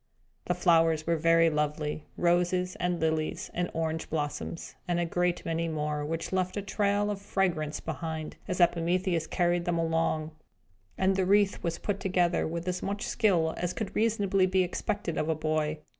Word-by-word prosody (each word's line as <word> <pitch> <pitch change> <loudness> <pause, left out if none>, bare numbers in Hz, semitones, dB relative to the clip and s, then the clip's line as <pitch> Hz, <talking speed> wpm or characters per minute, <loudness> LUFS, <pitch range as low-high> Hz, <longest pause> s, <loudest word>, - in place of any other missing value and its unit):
The 180 - 0
flowers 165 -3 +3
were 170 - +2
very 165 +1 +4
lovely 150 0 -2
roses, 180 +1 +2
and 180 -1 -1
lilies, 160 -1 -1
and 175 0 -1
orange 160 0 -2
blossoms, 150 +2 -3
and 175 -1 +1
a 175 - +1
great 175 +1 0
many 165 0 -1
more, 150 -2 -2
which 165 +2 -3
left 185 +1 0
a 205 - -2
trail 205 +1 +1
of 200 -1 -5
fragrance 175 -7 -1
behind, 160 0 -5
as 185 -2 -2
Epimetheus 175 0 +2
carried 175 -1 +1
them 175 -1 0
along; 165 -1 0 0.7
and 190 0 +2
the 190 -1 +1
wreath 200 0 +3
was 170 -1 -2
put 200 -1 -2
together 180 -2 +1
with 170 +2 -4
as 180 0 -1
much 200 +3 -3
skill 170 -7 +2
as 175 0 -2
could 215 -3 -5
reasonably 205 -4 +2
be 185 0 +3
expected 180 -1 -2
of 155 - -1
a 160 - +2
boy. 155 0 -1
170 Hz, 175 wpm, -29 LUFS, 160-185 Hz, 0.7 s, very